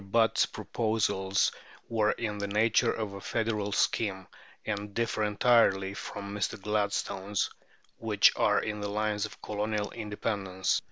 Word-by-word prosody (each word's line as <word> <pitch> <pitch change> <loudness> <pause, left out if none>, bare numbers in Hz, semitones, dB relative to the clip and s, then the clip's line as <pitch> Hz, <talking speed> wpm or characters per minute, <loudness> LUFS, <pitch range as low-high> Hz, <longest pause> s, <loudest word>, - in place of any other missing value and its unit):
Butt's 110 +3 +3
proposals 105 -4 0 0.4
were 110 -2 +2
in 105 -3 -3
the 100 - -2
nature 110 +2 +3
of 110 -3 -3
a 100 - -8
federal 105 -2 -1
scheme, 100 -2 0 0.4
and 105 -1 -4
differ 115 -2 0
entirely 105 -2 +3
from 100 0 -6
Mr. 105 - -2
Gladstone's, 100 -1 -1 0.5
which - - +4
are - - +2
on 105 -1 -3
the 100 - -2
lines 105 0 0
of - - -15
Colonial 105 0 -2
independence. 100 -3 -1
105 Hz, 130 wpm, -29 LUFS, 100-110 Hz, 0.5 s, which